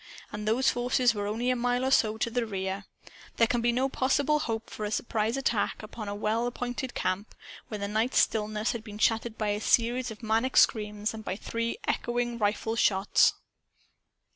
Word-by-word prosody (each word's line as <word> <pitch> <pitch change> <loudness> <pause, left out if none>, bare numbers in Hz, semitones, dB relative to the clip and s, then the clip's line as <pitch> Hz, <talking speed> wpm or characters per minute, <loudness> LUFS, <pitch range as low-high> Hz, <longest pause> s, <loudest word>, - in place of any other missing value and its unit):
And 210 0 -5
those 250 +5 +3
forces 245 0 +2
were 205 -1 -3
only 235 +4 0
a - - +1
mile 245 +1 0
or 265 - 0
so 220 -4 +3
to 230 +1 -1
the 245 0 0
rear. 195 -1 -3 0.5
There 230 - +6
can 235 +1 0
be 240 +1 +3
no 255 +3 +1
possible 280 +3 +1
hope 225 -6 -3
for 215 - -7
a 210 - -1
surprise 220 +2 -1
attack 235 -5 -1
upon 215 -1 -7
a 205 - -3
well 220 +3 0
appointed 245 +1 -4
camp 185 +3 -2 0.3
when 210 -2 -6
the 200 - -1
night's 220 +4 0
stillness 215 0 +1
has 235 - -4
been 210 -2 -9
shattered 225 +1 +1
by 215 -1 -1
a 205 +1 -1
series 245 +2 +2
of 220 +1 -10
maniac 225 +4 +1
screams 210 -1 +3
and 220 0 -8
by 190 - -3
three 230 - -3
echoing 240 0 -1
rifle 220 +1 0
shots. 195 -4 +3
225 Hz, 190 wpm, -28 LUFS, 210-245 Hz, 0.5 s, There